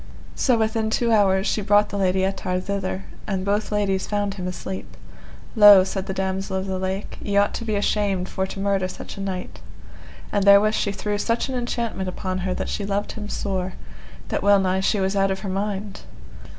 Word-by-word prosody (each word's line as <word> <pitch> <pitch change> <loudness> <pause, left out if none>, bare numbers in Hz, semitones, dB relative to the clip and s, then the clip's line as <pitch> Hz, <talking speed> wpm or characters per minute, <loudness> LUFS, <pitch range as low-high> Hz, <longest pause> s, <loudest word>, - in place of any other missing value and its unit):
So 250 -3 +2
within 220 0 0
two 235 +1 +1
hours 195 -3 +3
she 215 - 0
brought 205 +1 +3
the 200 - -4
Lady 190 0 +2
Ettard 185 -1 -2
thither, 195 -1 -3 0.2
and 190 -2 -2
both 205 +2 0
ladies 200 -2 0
found 205 -1 -1
him 185 -2 -5
asleep: 190 +1 -6 0.6
Lo, 205 -3 +9
said 190 0 -4
the 190 - -2
Damosel 190 0 -2
of 190 - -3
the 190 -1 -3
Lake, 190 +2 -4
ye 200 -1 -1
ought 205 0 +3
to 230 - -5
be 215 -2 -1
ashamed 200 -2 0
for 190 0 -2
to 195 - -7
murder 195 -1 +1
such 185 - -9
a - - -5
knight. 190 -2 -5 0.7
And 205 - +1
therewith 200 +2 +6
she 205 - 0
threw 205 +1 -3
such 230 +5 0
an 260 - -3
enchantment 235 -6 -2
upon 185 0 -3
her 185 0 -2
that - - -3
she 205 - -3
loved 200 +1 -2
him 210 -1 -7
sore, 190 -3 -2 0.6
that - - -1
well 200 0 +5
nigh 190 0 +1
she 195 +2 +1
was 190 +1 0
out 195 0 +2
of 190 0 -2
her 195 - -4
mind. 200 +1 -3
195 Hz, 205 wpm, -23 LUFS, 190-205 Hz, 0.7 s, Lo